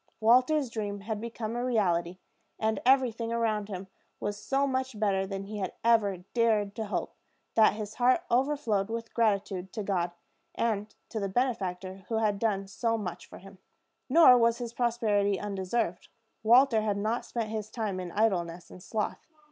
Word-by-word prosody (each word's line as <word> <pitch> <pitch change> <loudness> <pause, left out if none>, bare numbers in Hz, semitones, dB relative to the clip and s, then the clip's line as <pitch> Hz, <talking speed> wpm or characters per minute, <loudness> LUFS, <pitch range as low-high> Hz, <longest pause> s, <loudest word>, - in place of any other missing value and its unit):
Walter's 255 +4 +4
dream 205 -3 -4
had 215 +1 -4
become 230 -1 -5
a 240 - -2
reality; 180 -8 +1 0.4
and 220 0 0
everything 245 -4 +3
around 220 -3 0
him 190 -1 -5 0.3
was 205 0 -4
so 275 +1 +1
much 260 -4 -2
better 195 -2 +1
than 195 0 -4
he 210 +1 -6
had 190 -2 -3
ever 205 -6 +3
dared 220 -4 +2
to 220 -2 -3
hope, - - -3 0.4
that 220 -1 +5
his 210 -1 -6
heart 255 +8 +3
overflowed 245 -6 +1
with 230 0 -5
gratitude 200 -4 0
to 215 - -3
God, 180 -3 0 0.5
and 215 -2 -1
to 220 - -3
the 200 -1 -2
benefactor 190 -5 -2
who 225 - -1
had 210 -2 +1
done 200 -3 0
so 230 +4 -1
much 190 -5 -6
for - - -11
him. 195 0 -14 0.5
Nor 285 -7 +8
was 230 0 +3
this 235 -2 -5
prosperity 215 -5 +1
undeserved. 195 -2 -2 0.3
Walter 235 +1 +5
had 210 -2 0
not 220 +4 -1
spent 225 -2 -4
his 215 -1 -4
time 215 -5 -3
in 180 -1 -5
idleness 180 -5 0
and 180 - -12
sloth. 210 +3 -3
215 Hz, 170 wpm, -29 LUFS, 195-235 Hz, 0.5 s, Nor